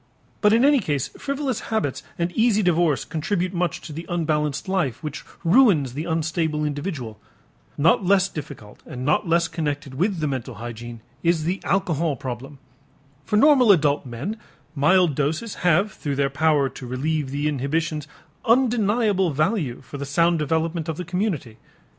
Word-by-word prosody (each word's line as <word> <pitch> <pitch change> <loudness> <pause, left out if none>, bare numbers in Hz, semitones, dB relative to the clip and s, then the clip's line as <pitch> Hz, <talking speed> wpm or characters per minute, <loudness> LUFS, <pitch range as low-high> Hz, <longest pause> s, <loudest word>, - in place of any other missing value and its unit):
But 210 - +5
in 230 +4 +5
any 285 -1 +5
case 145 - -1
frivolous 275 -4 -3
habits 145 - -1 0.2
and 170 0 -1
easy 220 0 +2
divorce 170 -6 +2
contribute 180 +3 -2
much 175 0 -1
to 155 - -9
the 165 +3 -7
unbalanced 150 -4 -1
life 175 -11 -1
which 150 -1 -5 0.2
ruins 170 - +4
the 150 +4 -4
unstable 160 -2 -1
individual. 145 - -4 0.6
Not 165 +6 +4
less 190 +1 +4
difficult 140 - -9
and 125 0 -6
not 155 +5 +1
less 170 0 +3
connected 145 -4 -3
with 185 +8 0
the 155 - -1
mental 130 -4 -3
hygiene 120 +1 -8 0.2
is 170 -2 +2
the 180 +4 -2
alcohol 170 -6 0
problem. 130 +3 -7 0.7
For 210 - +1
normal 260 -3 +6
adult 150 -6 +3
men 135 - -5 0.4
mild 165 +3 +3
doses 155 - -1
have 180 +4 +3
through 145 -2 -4
their 140 0 +1
power 145 -1 +2
to 130 -1 -9
relieve 145 +3 -1
the 145 +2 -1
inhibitions 150 +2 -1 0.4
undeniable 225 -5 +2
value 155 - -1
for 140 +1 -9
the 140 - -3
sound 170 +4 +2
development 160 +2 -1
of 160 - -3
the 180 - -5
community. 175 - -2
160 Hz, 160 wpm, -23 LUFS, 140-185 Hz, 0.7 s, normal